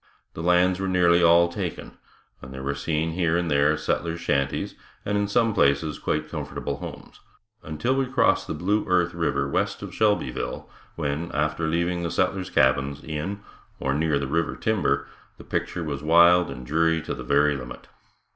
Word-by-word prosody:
The - - -6
lands 90 +2 +3
were 95 - -2
nearly 90 -2 +4
all 85 0 +6
taken 85 - -6 0.4
and 65 - -10
there 65 0 -7
were 70 +1 -1
seen 80 +3 -1
here 85 -1 +1
and 85 -2 -1
there 75 +2 +3
settlers' 85 +2 -2
shanties, 70 -4 -1 0.3
and 105 - -1
in 100 0 +1
some 115 +1 +2
places 70 -1 +1
quite - - -2
comfortable - - -5
homes, - - -10 0.4
until 80 - -2
we 135 -1 0
crossed 130 - +2
the - - -3
Blue 105 +4 0
Earth 90 -2 +2
river 85 -1 -1
west - - -1
of - - -7
Shelbyville, 105 -2 -1 0.3
when, 80 +2 -3
after 75 +2 0
leaving 85 +2 0
the 85 - -2
settlers' 95 +2 -1
cabins 70 -1 +1
in 80 +7 -4 0.4
or 70 - -1
near 75 0 +1
the 70 - -2
river 80 +5 -1
timber, 110 -3 0 0.3
the - - -12
picture 85 - -3
was 70 -3 -4
wild 85 +2 +5
and 65 - -8
dreary 80 +3 +1
to - - -4
the - - -7
very 75 +1 +3
limit. 65 -2 -9
85 Hz, 175 wpm, -25 LUFS, 75-90 Hz, 0.4 s, all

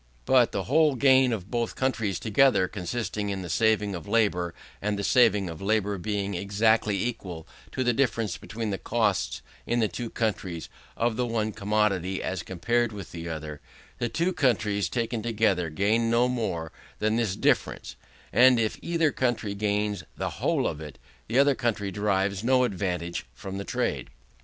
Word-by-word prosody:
But, 125 -3 +4
the 100 - -2
whole 150 +3 +3
gain 130 -1 +5
of 100 -4 -4
both 120 -2 -1
countries 115 -8 0
together, 110 -3 +3
consisting 105 +2 -3
in 95 -2 -3
the 85 - -5
saving 110 0 +2
of 85 -4 -7
labour; 90 -7 +1 0.3
and 105 0 -1
the 100 - -3
saving 105 -5 +4
of 80 0 -7
labour 100 -1 0
being 100 +1 -2
exactly 100 +1 +1
equal 90 -9 -5 0.2
to 130 - -1
the 120 -1 +2
difference 115 -6 0
between 110 -1 -5
the 95 - -3
costs, - - 0 0.2
in 120 - +1
the 110 - +3
two 120 +2 -5
countries, 95 -8 -3 0.3
of 115 -1 0
the 125 -1 0
one 110 -2 -1
commodity 100 -3 0
as 95 -2 -2
compared 115 +7 0
with 100 -4 -8
the 85 0 -6
other; 75 -2 -6 0.4
the 120 -1 -1
two 170 +7 0
countries 110 - +1
taken 115 -1 -2
together 105 -7 +1
gain 105 +8 +1
no 120 +2 +3
more 110 -10 -2 0.3
than 110 +1 +1
this 115 -5 0
difference: - - 0 0.4
and 125 +2 +6
if 110 -1 -1
either 165 -3 +1
country 120 -6 -1
gains 105 -1 -1
the - - -2
whole - - +1
of 75 - -2
it, 75 -3 -9 0.3
the 120 - 0
other 140 +1 +5
country 115 -6 -1
derives 100 0 0
no 130 +1 +4
advantage 90 - -2
from 95 +8 -6
the - - -3
trade. - - -2
105 Hz, 170 wpm, -27 LUFS, 95-120 Hz, 0.4 s, and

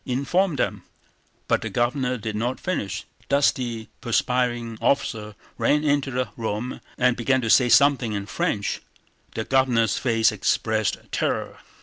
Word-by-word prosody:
Inform 150 +8 0
them..." - - -1 0.7
But - - +2
the - - -4
Governor 125 +1 0
did 110 -1 -5
not 120 +4 -2
finish: 140 - -3
a - - -32
dusty 125 -5 +1
perspiring 120 -2 0
officer 110 -4 0 0.2
ran 150 +1 +2
into 145 -2 +1
the 125 -3 -2
room 115 +2 -4 0.2
and 125 -1 +3
began 130 +2 +1
to 115 -2 0
say 125 -2 +5
something 135 -5 +4
in 100 -1 -3
French. 105 -1 -2 0.5
The 110 - -1
Governor's 120 -5 +2
face 115 -2 +3
expressed 110 0 0
terror. - - -2
120 Hz, 140 wpm, -24 LUFS, 110-130 Hz, 0.7 s, say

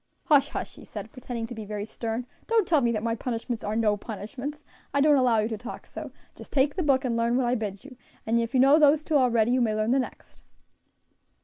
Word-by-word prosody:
"Hush, 290 -3 +4
hush!" - - -5
he - - -14
said, - - -8
pretending 245 -3 -5
to 225 - -8
be 220 -2 -7
very 210 0 -5
stern; 230 +2 -4 0.2
"don't 450 -5 +2
tell 315 -4 +4
me 235 -2 +2
that 215 -2 -2
my 230 0 0
punishments 235 0 -4
are 210 +1 -2
no 220 -2 +2
punishments, 250 +8 -7 0.3
I - - +4
don't 295 +1 +5
allow 250 -4 +3
you 215 0 +2
to 220 -2 -4
talk 245 +3 -8
so; - - -8 0.2
just - - -13
take 280 +1 +2
the 370 - -1
book 275 -4 +2
and 240 -2 0
learn 230 +1 +1
what 260 - +1
I 240 - +1
bid 210 -2 -4
you; 275 -2 -11 0.3
and 230 +1 +2
if 230 +3 -2
you - - +4
know 275 +4 +6
those 300 0 +5
two 320 - -4
already, 240 -4 +3
you 255 0 +2
may 220 -3 +1
learn 215 +2 0
the 270 - +3
next." 255 - -7
245 Hz, 245 wpm, -26 LUFS, 225-275 Hz, 0.3 s, know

